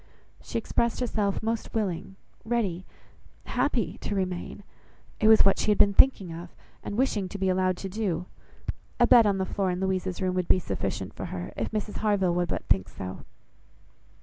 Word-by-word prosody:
She - - -4
expressed 235 +1 0
herself 215 -5 -1
most 225 0 -2
willing, 195 -2 -2 0.3
ready, 205 -6 -1 0.6
happy - - -1
to 205 - -3
remain. 185 +1 -3 0.6
"It 215 - +3
was 220 -2 +7
what 195 - +4
she - - +1
had 210 - +4
been 200 - +5
thinking 195 -8 +4
of, 170 +1 -8 0.3
and 205 - -5
wishing 215 -7 +1
to 200 - -6
be 190 -1 0
allowed 185 0 +1
to 195 - -5
do. 190 -3 -2 0.7
A 240 - +6
bed 235 -2 +7
on 200 -1 +2
the 190 - 0
floor 195 0 -1
in 180 0 -2
Louisa's 190 -1 -1
room 185 -1 0
would 180 -1 -1
be - - +5
sufficient 100 - -3
for - - -6
her, 90 -1 -6
if - - -2
Mrs 215 -1 -3
Harville 200 -4 +2
would 175 0 0
but - - -3
think 95 -1 +1
so." 95 -1 -7
195 Hz, 185 wpm, -27 LUFS, 180-215 Hz, 0.7 s, was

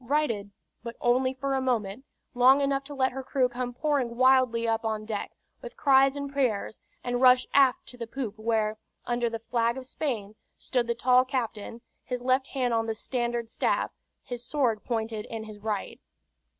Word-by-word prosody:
Righted: 235 -7 0 0.3
but 235 0 -7
only 255 +2 +2
for 275 +1 -2
a 265 - +1
moment, 240 -1 -1 0.3
long 255 +2 +6
enough 275 -1 0
to 290 0 -8
let 260 -1 +2
her 265 +2 -5
crew 260 0 +1
come 245 0 -4
pouring 255 -3 -1
wildly 255 -3 +4
up 225 0 0
on 215 -1 -2
deck, 215 -2 -3 0.3
with - - -9
cries 270 -1 +5
and 280 -1 -5
prayers, 240 -6 -1 0.2
and 245 0 -1
rush 255 -1 +6
aft 270 -3 +4
to 245 - -11
the 230 - -4
poop, 225 -4 -5
where, 215 -1 0 0.3
under 240 -1 0
the 230 - -4
flag 230 +1 0
of 260 - -7
Spain, 235 -8 -3 0.2
stood 245 -3 -1
the 235 - 0
tall 250 +1 +4
captain, 235 -3 -4 0.2
his 250 -1 -4
left 260 +1 +2
hand 250 -3 -1
on 225 0 +1
the 225 - -2
standard 240 0 -2
staff, 230 - 0 0.3
his 245 -2 -6
sword 245 -5 0
pointed 220 -2 -3
in 225 -1 -5
his 215 -1 -10
right. 210 -2 -4
245 Hz, 185 wpm, -27 LUFS, 225-265 Hz, 0.3 s, long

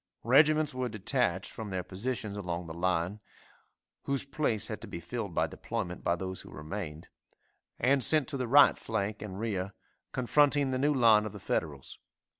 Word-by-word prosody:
Regiments 150 +4 +4
were 130 -1 -2
detached 105 -3 -1
from 110 -2 -7
their 95 -1 -2
positions 105 +2 -3
along 90 -3 -4
the 80 - -7
line 90 +3 -1 0.9
(whose 140 0 -1
place 140 -7 -1
had - - -5
to - - -8
be 85 - -6
filled 100 +1 -5
by 80 - +3
deployment 90 +2 -5
by 85 - +2
those 95 +1 -4
who - - -13
remained) 80 -1 -6 0.7
and 135 +1 +3
sent 155 -2 +4
to - - -3
the 130 -2 -2
right 140 +4 +6
flank 105 -1 -3
and 100 -2 -6
rear, 100 -4 -2 0.4
confronting 140 +2 +3
the 130 - -1
new 145 +3 +3
line 110 -4 +5
of 105 - -8
the - - -8
Federals. 70 -4 -3
105 Hz, 175 wpm, -30 LUFS, 90-130 Hz, 0.9 s, right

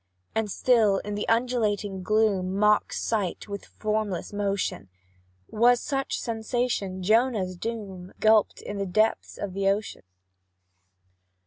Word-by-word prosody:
And 220 -1 -1
still 215 -3 +3
the 205 0 -3
undulating 220 -5 0
gloom 195 -2 +1
Mocks 210 0 +2
sight 205 -5 -2
with 200 -1 -6
formless 210 -4 -3
motion: 200 - -2 0.6
Was 240 +2 +4
such 270 0 -2
sensation 225 -5 -2
Jonah's 215 -3 +2
doom, 195 -3 -6
Gulphed 215 -1 +3
in 205 -1 -5
the 195 - -2
depths 215 +5 +1
of 190 -2 -5
ocean? 195 +2 0
210 Hz, 110 wpm, -26 LUFS, 195-225 Hz, 0.6 s, Was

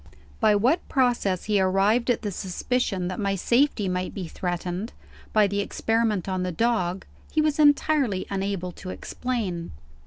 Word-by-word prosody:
By 215 -3 +4
what 255 - +1
process 240 - +1
he 210 -2 +2
arrived 195 +6 +2
at 245 - +1
the 205 - -2
suspicion 190 +1 -1
that 185 - -4
my 200 -1 0
safety 235 +1 +2
might 180 0 -2
be 185 -4 -4
threatened, 180 +4 -4 0.4
by 215 -1 +5
the 200 0 -1
experiment 220 -2 0
on 185 -1 -1
the 180 0 -1
dog, 190 -3 0 0.3
he 310 - 0
was 305 -1 +1
entirely 290 -8 +3
unable 195 -2 -2
to 185 +2 -9
explain. 190 - -4
200 Hz, 155 wpm, -25 LUFS, 185-240 Hz, 0.4 s, by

